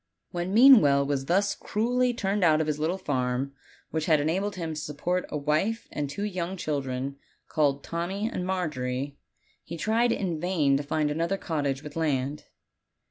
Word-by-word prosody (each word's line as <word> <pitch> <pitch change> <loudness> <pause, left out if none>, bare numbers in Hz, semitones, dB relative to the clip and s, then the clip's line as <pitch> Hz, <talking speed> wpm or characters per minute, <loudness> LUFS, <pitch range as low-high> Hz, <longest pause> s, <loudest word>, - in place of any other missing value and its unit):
When 175 +1 -3
Meanwell 210 - +7
was 140 -1 -1
thus 200 +5 +2
cruelly 245 +4 0
turned 205 -4 -1
out 155 -2 +5
of 160 - +1
his 150 -1 -2
little 165 +5 0
farm, 130 -4 -1 0.4
which 160 -1 -2
had 155 -3 +5
enabled 190 +8 0
him 165 -3 -4
to 155 - -4
.support 175 +5 -2
a - - -2
wife 155 +10 0
and 145 -1 -3
two 200 +8 -4
young 185 -2 -3
children, 140 -4 -3 0.3
called 140 -2 +1
Tommy 185 +5 -2
and 180 - -3
Margery, 140 -7 -2 0.4
he 170 - -7
tried 230 +6 +2
in 180 -8 -1
vain 155 -5 +2
to - - -2
find 150 +1 0
another 170 +5 0
cottage 145 -6 -2
with 150 -1 -9
laud. 145 -3 -1
160 Hz, 170 wpm, -27 LUFS, 145-190 Hz, 0.4 s, Meanwell